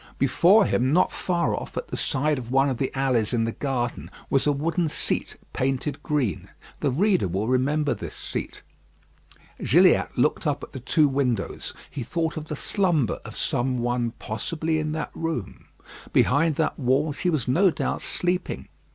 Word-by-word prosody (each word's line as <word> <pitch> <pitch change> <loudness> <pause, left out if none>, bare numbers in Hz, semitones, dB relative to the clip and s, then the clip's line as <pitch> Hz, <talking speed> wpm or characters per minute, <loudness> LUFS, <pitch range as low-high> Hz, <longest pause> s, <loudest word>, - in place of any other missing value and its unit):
Before 180 - +5
him, 130 -3 +1
not 180 +4 +3
far 175 -2 0
off, - - -5
at - - -4
the - - -3
side 145 +1 0
of 120 -2 -8
one 135 +2 +3
of 130 - -2
the 135 - -1
alleys 125 -5 +1
in 115 -2 +2
the 115 - -1
garden, 125 -2 -3 0.2
was 135 +1 +2
a - - +5
wooden 165 +4 0
seat - - -1 0.2
painted 135 +2 -1
green. 135 - -1 0.3
The 145 - +1
reader 180 - +2
will 95 +5 -2
remember 140 +4 +1
this - - -7
seat. - - -5 1.0
Gilliatt - - +5
looked - - +1
up - - -1
at - - -9
the - - -7
two 150 +4 +3
windows. 130 -7 -1 0.2
He 140 - -5
thought 165 +6 -2
of 155 -2 -5
the 150 - -3
slumber 170 - +1
of - - -9
some 125 +1 0
one 120 -1 -1
possibly 155 +9 -2
in 155 0 -2
that 160 -1 -3
room. 165 - -4 0.5
Behind 150 +4 +3
that 160 +1 -1
wall 140 +4 +2
she 180 - -1
was 150 -8 -1
no 180 +10 +4
doubt 160 - -2
sleeping. 180 +1 -2
140 Hz, 175 wpm, -25 LUFS, 125-160 Hz, 1.0 s, Before